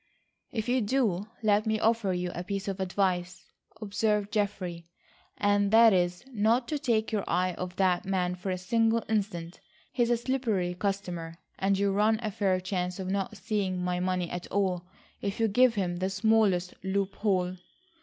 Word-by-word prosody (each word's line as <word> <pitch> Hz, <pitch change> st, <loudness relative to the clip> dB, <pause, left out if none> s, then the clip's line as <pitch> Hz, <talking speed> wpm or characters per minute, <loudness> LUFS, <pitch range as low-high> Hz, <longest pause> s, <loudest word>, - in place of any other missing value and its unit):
"If 220 Hz, -2 st, -3 dB
you 250 Hz, +1 st, +2 dB
do, 210 Hz, -4 st, 0 dB, 0.2 s
let 210 Hz, 0 st, +3 dB
me 220 Hz, 0 st, +1 dB
offer 225 Hz, -3 st, +2 dB
you 180 Hz, -1 st, -2 dB
a 175 Hz, -, -4 dB
piece 195 Hz, +1 st, -4 dB
of 195 Hz, -1 st, -3 dB
advice," 185 Hz, -1 st, -1 dB, 0.3 s
observed 210 Hz, -1 st, 0 dB
Geoffrey, 185 Hz, -5 st, -2 dB, 0.5 s
"and 205 Hz, 0 st, +2 dB
that 225 Hz, 0 st, +7 dB
is 180 Hz, +4 st, 0 dB
not 230 Hz, +2 st, +2 dB
to 300 Hz, -, -1 dB
take 230 Hz, -6 st, 0 dB
your 210 Hz, -3 st, 0 dB
eye 185 Hz, 0 st, +1 dB
off 180 Hz, +1 st, -6 dB
that 185 Hz, 0 st, +2 dB
man 185 Hz, -2 st, 0 dB
for 180 Hz, +2 st, -5 dB
a 185 Hz, -, -1 dB
single 225 Hz, +4 st, +1 dB
instant. 195 Hz, -6 st, -2 dB, 0.3 s
He -, -, -1 dB
is 235 Hz, -, +3 dB
a 240 Hz, -, +3 dB
slippery 230 Hz, -8 st, -1 dB
customer, 180 Hz, -4 st, -3 dB, 0.2 s
and 195 Hz, 0 st, +2 dB
you 200 Hz, 0 st, +2 dB
run 215 Hz, +2 st, +3 dB
a 215 Hz, -, -1 dB
fair 195 Hz, -3 st, +1 dB
chance 180 Hz, -1 st, -2 dB
of 190 Hz, -1 st, -3 dB
not 200 Hz, +2 st, -2 dB
seeing 195 Hz, -4 st, -1 dB
my 180 Hz, 0 st, -1 dB
money 180 Hz, -1 st, 0 dB
at 175 Hz, 0 st, -5 dB
all, 180 Hz, -3 st, -1 dB, 0.3 s
if 200 Hz, +1 st, -3 dB
you 225 Hz, -, +3 dB
give 245 Hz, +3 st, +4 dB
him 180 Hz, -3 st, -1 dB
the 185 Hz, +1 st, -1 dB
smallest 195 Hz, -2 st, +2 dB
loophole." 190 Hz, -1 st, 0 dB
195 Hz, 175 wpm, -29 LUFS, 180-220 Hz, 0.5 s, that